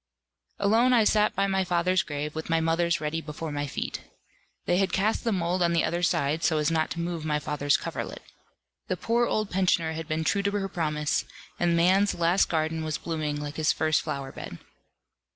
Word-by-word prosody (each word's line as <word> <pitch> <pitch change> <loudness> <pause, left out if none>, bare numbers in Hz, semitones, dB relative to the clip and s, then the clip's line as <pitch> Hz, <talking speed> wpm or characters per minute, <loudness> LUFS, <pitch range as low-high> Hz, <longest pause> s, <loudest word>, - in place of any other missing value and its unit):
Alone 225 +5 +3
I 235 -3 +5
sat 210 0 +3
by 195 - +2
my 190 -1 +1
father's 180 +1 +2
grave, 150 0 -4
with 160 +1 -6
my 165 0 +3
mother's 170 +1 +1
ready 155 +1 -2
before 155 +1 -6
my 145 0 -2
feet. - - -4 0.6
They 175 - +2
had 195 0 +1
cast 210 +3 +1
the 230 - 0
mould 180 -1 0
on 170 -1 +3
the 170 - +2
other 175 +1 -1
side, 160 -2 +1
so 160 - +2
as 150 +1 +1
not 160 -1 +1
to 170 - -5
move 170 -1 -3
my 150 -1 0
father's 145 -1 +1
coverlet. - - -6 0.6
The - - -1
poor 235 +1 +1
old 215 -2 -1
pensioner 180 -3 +2
had 160 0 -5
been 155 +1 -1
true 200 +5 +1
to 200 - 0
her 200 -1 -1
promise, 150 -4 -1 0.3
and 170 -1 +2
man's 190 +4 +3
last 170 +3 +2
garden 160 0 -1
was 155 0 -2
blooming 155 -3 -3
like 145 0 -6
his 155 -1 +3
first 155 -1 +1
flower 135 -1 -4
bed. - - -8
165 Hz, 205 wpm, -27 LUFS, 155-185 Hz, 0.6 s, I